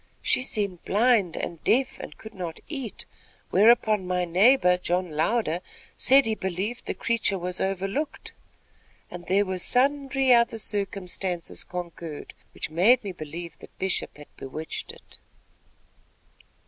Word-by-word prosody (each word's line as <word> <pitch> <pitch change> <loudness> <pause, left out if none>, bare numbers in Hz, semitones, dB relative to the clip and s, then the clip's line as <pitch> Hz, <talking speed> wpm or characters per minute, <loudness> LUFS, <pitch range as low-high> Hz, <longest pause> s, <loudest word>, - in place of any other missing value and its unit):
She - - +3
seemed 200 -8 -1
blind 210 -4 +2
and 170 -2 -5
deaf 265 +2 +1
and - - -9
could 220 0 -11
not 175 -5 -6
eat, 270 -8 -5 0.5
whereupon 215 -2 +4
my 180 0 0
neighbor 180 +2 +5
John 180 -1 -1
Louder 165 +2 0 0.4
said 270 +1 +5
he 220 - +1
believed 195 +4 -4
the - - -2
creature 230 -4 0
was 180 0 -3
overlooked, 195 +10 -3 0.8
and 175 -1 -9
there 200 +3 +3
were 185 -1 -3
sundry 270 +3 +2
other 235 -1 +3
circumstances 190 -4 -2
concurred, 170 -3 -7 0.2
which - - -3
made 220 +10 +4
me 200 - -4
believe 170 0 -8
that - - -15
Bishop 190 -5 -1
had 150 - -15
bewitched 155 +4 -6
it." - - -16
190 Hz, 135 wpm, -26 LUFS, 175-235 Hz, 0.8 s, neighbor